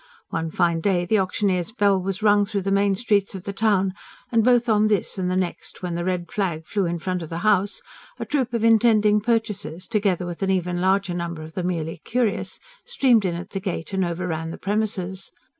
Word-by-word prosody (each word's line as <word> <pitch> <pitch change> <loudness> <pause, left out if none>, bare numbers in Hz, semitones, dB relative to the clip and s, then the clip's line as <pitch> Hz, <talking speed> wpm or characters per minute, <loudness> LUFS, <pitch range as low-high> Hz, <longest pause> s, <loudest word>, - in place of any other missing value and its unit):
One 165 0 -2
fine 170 0 +1
day 180 -1 +1
the 215 +4 +2
auctioneer's 185 0 0
bell 200 -4 +2
was 195 +3 -4
rung 205 -1 +5
through 200 -1 -2
the 195 - -1
main 200 0 +3
streets 200 -2 +1
of 185 - -7
the 200 - -5
town; 195 -3 +2 0.4
and 230 -2 +3
both 245 0 +4
on 215 -1 +4
this 205 -2 0
and 180 -1 0
the 185 - 0
next, 185 0 -3
when 175 -1 -2
the 170 +1 -2
red 180 -1 -2
flag 170 -6 -2
flew 195 +2 -1
in 170 0 -2
front 180 +2 -3
of 160 - -7
the 165 - -4
house, 205 -1 +2 0.3
a - - -4
troop 265 -5 -1
of 230 - -1
intending 215 -2 +4
purchasers, 210 -6 -2
together 200 -5 0
with 175 +1 -6
an 195 - 0
even 180 -2 0
larger 190 0 +2
number 170 -2 -4
of 160 +1 -10
the 185 - -3
merely 170 -2 -2
curious, 235 -4 -1 0.2
streamed 260 - +3
in 175 -2 0
at 175 +1 -7
the 195 - -3
gate 185 -2 -4
and 190 -1 +1
overran 170 -2 -3
the 165 - -6
premises. 195 -2 -2
190 Hz, 215 wpm, -23 LUFS, 175-210 Hz, 0.4 s, rung